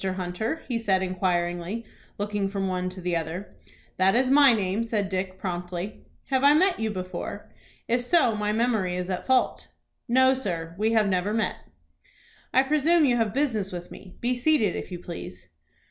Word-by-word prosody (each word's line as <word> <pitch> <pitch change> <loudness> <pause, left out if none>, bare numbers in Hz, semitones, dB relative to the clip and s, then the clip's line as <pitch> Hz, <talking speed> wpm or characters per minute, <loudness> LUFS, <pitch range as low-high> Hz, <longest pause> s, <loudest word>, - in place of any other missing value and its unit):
Hunter?" 190 - -3
he 240 -3 -1
said, 190 -4 +1
inquiringly, 180 +3 -1 0.3
looking 205 -1 -1
from 195 -1 -2
one 185 -1 -1
to 185 +1 -9
the 180 -1 -1
other. 165 +4 -4 0.4
"That 190 +2 +4
is 255 +1 +3
my 280 -1 +7
name," 205 0 0
said 215 -4 -1
Dick, 185 0 -3
promptly. 180 +1 -5 0.3
"Have 265 0 +2
I 285 +1 +7
met 370 +3 +3
you 220 0 0
before? 185 -3 -6 0.4
If 240 +1 +1
so, 245 -3 +3
my 210 0 -1
memory 220 -5 +1
is 180 +1 -3
at 180 - -4
fault." 260 -1 +1 0.4
"No, 260 +2 +5
sir, 170 -10 -3
we 220 +1 +2
have 215 -2 +3
never 195 +2 0
met." 225 - 0 0.9
"I 260 - +5
presume 305 +3 +3
you 245 -3 +3
have 225 -3 +1
business 225 -7 0
with 175 -1 -7
me. 185 -2 -12
Be 245 +1 +1
seated, 245 - +2
if - - -6
you 180 - -4
please." 90 - -9
205 Hz, 175 wpm, -26 LUFS, 185-245 Hz, 0.9 s, my